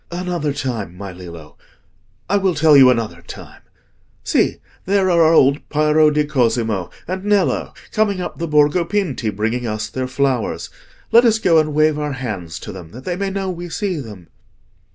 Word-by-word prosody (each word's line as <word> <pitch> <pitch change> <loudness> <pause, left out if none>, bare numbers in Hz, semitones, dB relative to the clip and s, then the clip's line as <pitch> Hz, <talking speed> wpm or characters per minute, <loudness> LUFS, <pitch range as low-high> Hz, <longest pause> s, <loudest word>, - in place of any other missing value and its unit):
"Another 175 -4 -2
time, 115 -10 -4
my 100 0 -7
Lillo—I 90 - -8
will 190 -3 +1
tell 155 -1 +5
you 135 -2 +8
another 110 -9 -1
time. 85 - -12 0.6
See, - - +1 0.3
there 195 -1 +2
are 170 -1 +4
our 160 0 +5
old 140 -2 +4
Piero 155 0 +3
di 150 0 +1
Cosimo 115 - 0 0.2
and 185 +2 -4
Nello 205 -2 0 0.2
coming 205 -3 0
up 180 - -6
the 170 - -2
Borgo 150 +3 +3
Pinti, 170 - -2
bringing 110 +4 -2
us 110 -1 -3
their 130 0 -3
flowers. 130 -2 -1 0.4
Let 235 +1 +7
us 225 -2 +4
go 170 -6 +3
and 155 -1 -1
wave 155 0 +3
our 150 -1 -2
hands 105 -11 -5
to - - -7
them, 90 -4 -10
that 125 +3 -11
they 175 - -2
may 195 +1 -2
know 195 -1 -3
we 175 0 -7
see 190 0 -2
them." 105 - -9
145 Hz, 175 wpm, -19 LUFS, 110-175 Hz, 0.6 s, you